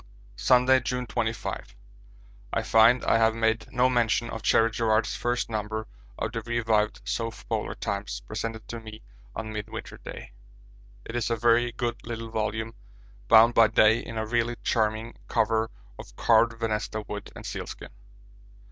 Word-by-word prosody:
Sunday, 130 +1 +5
June 125 0 -3
25. 115 -1 -3 0.8
I - - +1
find 115 +2 +5
I - - +3
have 110 0 +3
made 115 0 0
no 125 +1 +3
mention 120 -2 +1
of 115 - -5
Cherry 115 +1 +3
Garrard's 110 0 +1
first 120 +1 -1
number 110 0 -3 0.3
of 110 - -2
the 115 0 -3
revived 110 -2 0
South 115 -1 -4
Polar - - -2
Times, - - -3
presented 110 - -5
to 115 - -5
me 110 -1 -11 0.3
on 110 -1 -5
Midwinter 110 +2 -6
Day. - - -9 0.7
It 115 - -7
is 120 -3 0
a 115 - +1
very 120 +1 +3
good 120 0 -2
little 115 -1 -6
volume, 110 +1 -2 0.5
bound 115 +2 +7
by 115 -1 +6
Day 110 +2 +4
in 115 - -7
a 110 - -1
really 120 +1 0
charming 110 0 -1
cover 110 0 +1 0.3
of - - -11
carved 115 0 +4
venesta 110 -1 -2
wood 105 -1 -6
and - - -9
sealskin. - - -6
115 Hz, 155 wpm, -27 LUFS, 110-120 Hz, 0.8 s, bound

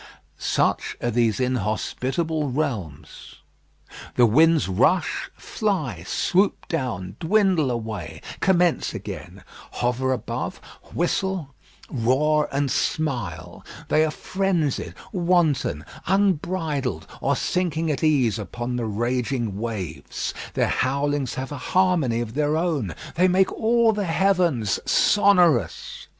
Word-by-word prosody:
Such - - 0
are 120 - -1
these 115 -3 +1
inhospitable 130 - -1
realms. 115 - -4 0.8
The 120 - +6
winds 160 +7 +4
rush, 130 - +1
fly, 170 - -2
swoop 195 +2 +1
down, 115 - -3
dwindle 180 -4 +2
away, 110 -7 -5 0.2
commence 180 -3 +2
again; - - -8 0.3
hover 125 +2 0
above, 125 -5 -3 0.3
whistle, 175 -3 -1 0.3
roar, 145 +5 +1
and 140 -1 0
smile; 125 - -2 0.3
they 155 - +4
are 160 - +1
frenzied, 165 - -1 0.2
wanton, 170 - +1 0.2
unbridled, 170 -7 0 0.2
or 140 - +2
sinking 165 0 0
at 145 - -3
ease 130 -8 +3
upon 120 +4 -4
the 115 -2 -2
raging 120 -1 -1
waves. 105 -8 -4 0.2
Their - - +2
howlings 140 0 0
have 130 +1 -5
a 145 - -4 0.2
harmony 170 -11 +3
of 115 -2 -5
their 150 +2 +1
own. 150 - -1 0.2
They 180 +2 +3
make 185 +1 +3
all 230 0 +3
the 205 -1 -2
heavens 170 - +2
sonorous. 175 - +3
145 Hz, 110 wpm, -24 LUFS, 120-175 Hz, 0.8 s, The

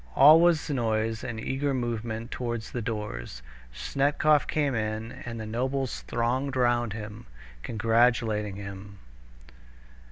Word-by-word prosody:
All 155 +4 +8
was 170 -3 +3
noise 115 -5 -1
and 115 -2 -4
eager 135 +4 -1
movement 115 -1 -3
towards 120 -3 -4
the 120 - -3
doors. 105 - -5 0.3
Snetkov 140 - +2
came 145 -3 0
in, 110 0 -2
and 115 -2 -7
the 110 - -5
nobles 130 +4 -2
thronged 130 +4 -1
round 120 -3 +2
him, 105 - -8 0.3
congratulating 110 - +1
him. 100 0 -8
115 Hz, 120 wpm, -27 LUFS, 110-130 Hz, 0.3 s, All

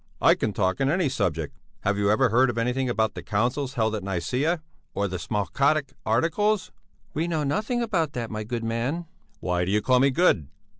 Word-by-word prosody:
I - - +6
can 110 - -1
talk 95 +4 0
on 135 - +3
any 170 -1 +2
subject. 85 - -1 0.3
Have 105 +1 +1
you 100 0 +1
ever 120 +4 +4
heard 120 +1 +3
anything 125 +2 0
about 110 -3 +1
the - - -6
councils 125 +6 -1
held 110 -2 +1
at 110 - -2
Nicæa, 110 - -1 0.4
or 100 - 0
the 90 -1 -4
Smalcaldic 135 - 0
Articles?" 170 - +1 0.4
"We 160 +3 -1
know 160 -3 0
nothing 215 - 0
about 170 -10 0
that, 120 -2 -4
my 110 0 -3
good 115 +1 -4
man." 120 +9 -2 0.4
"Why 90 -1 0
do 90 - -2
you 105 - +3
call 125 +4 +3
me 135 +2 +5
good? 130 - +3
120 Hz, 195 wpm, -25 LUFS, 105-145 Hz, 0.4 s, I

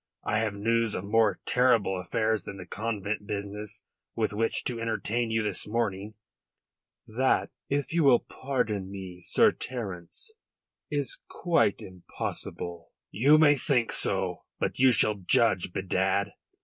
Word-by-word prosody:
I 110 - +1
have 110 -2 -1
news 115 +1 +1
of 90 - -3
more 110 +1 +2
terrible 115 -7 +3
affairs 110 +4 0
than 100 - -7
the 90 - -8
convent 105 0 -3
business 105 0 -5 0.3
with 110 -2 0
which 115 +2 0
to 120 -2 -2
entertain 115 +1 -1
you 110 0 +1
this 105 -3 -2
morning." 105 -2 -2 0.9
"That, 130 +4 +1 0.2
if 145 +3 -1
you 170 -1 +3
will 135 -4 +7
pardon 105 -8 -2
me, 95 -2 -8
Sir - - +4
Terence, 105 - -6 0.6
is 145 -4 -2
quite 115 - +1
impossible." 85 -1 -6 0.2
"You 140 +8 +5
may 150 -2 +6
think 125 -3 +1
so. - - 0
But - - -2
you 130 0 +6
shall 110 -2 +4
judge, 95 -1 +2
bedad. 95 +2 0
110 Hz, 135 wpm, -28 LUFS, 100-120 Hz, 0.9 s, will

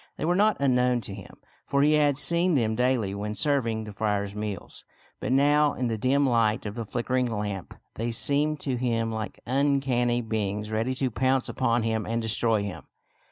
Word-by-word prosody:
They - - -3
were 175 - +2
not 210 +2 +3
unknown 125 -3 +2
to 100 - -7
him, 95 -1 -11 0.3
for 140 0 +2
he 150 +1 +4
had 145 -2 +3
seen 170 +3 +3
them 110 -4 +1
daily 125 -4 0
when 105 +1 -4
serving 120 -6 0
the 105 -1 -9
friar's 100 -1 -1
meals; 105 -3 -6 0.4
but - - -3
now 145 +2 +3
in 125 -1 -1
the 110 - -2
dim 140 +4 +2
light 115 -3 +1
of 105 - -4
the 115 +1 -5
flickering 125 +3 -1
lamp 105 -4 -4 0.2
they 115 +2 -3
seemed 145 +6 +3
to 130 -3 -1
him 115 -2 -1
like 110 -1 -5
uncanny 130 -2 +1
beings 105 -2 -3
ready 115 +4 -1
to 130 -1 -1
pounce 130 +2 +1
upon 120 -2 0
him 110 -1 -1
and 115 +1 -1
destroy 115 -1 0
him. 100 -3 -7
120 Hz, 190 wpm, -26 LUFS, 110-135 Hz, 0.4 s, he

